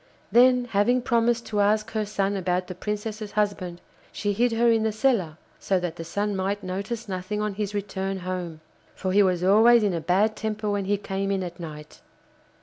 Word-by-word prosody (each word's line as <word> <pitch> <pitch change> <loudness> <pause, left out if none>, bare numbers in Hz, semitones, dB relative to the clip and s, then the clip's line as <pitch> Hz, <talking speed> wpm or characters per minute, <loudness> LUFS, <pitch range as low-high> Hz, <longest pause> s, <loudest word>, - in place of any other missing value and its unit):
Then, 250 +1 +5
having 240 +3 +2
promised 235 0 +1
to 210 - -2
ask 215 +2 +2
her 215 -2 -2
son 200 -1 -1
about 180 -1 -1
the 185 - -7
Princess's 210 +2 -5
husband, 200 -4 -1 0.3
she 205 -1 -2
hid 240 +4 +2
her 235 +1 +3
in 225 -1 +3
the 220 0 +1
cellar, 215 -8 +1 0.2
so 190 -2 +1
that 175 -2 -4
the 165 - -5
Sun 205 +5 -2
might 195 +2 -2
notice 200 +5 -4
nothing 185 +2 -3
on 210 -1 -1
his 205 0 -3
return 195 -1 -3
home, 180 -3 -5 0.3
for 185 - -2
he 205 +2 +5
was 180 -3 +2
always 220 +4 +6
in 200 -3 +1
a 165 - -2
bad 200 +6 +2
temper 215 -1 -3
when 200 -1 -1
he 205 +1 +1
came 195 0 -3
in 195 -1 0
at 175 -1 -7
night. 150 -2 -9
205 Hz, 200 wpm, -25 LUFS, 185-215 Hz, 0.3 s, always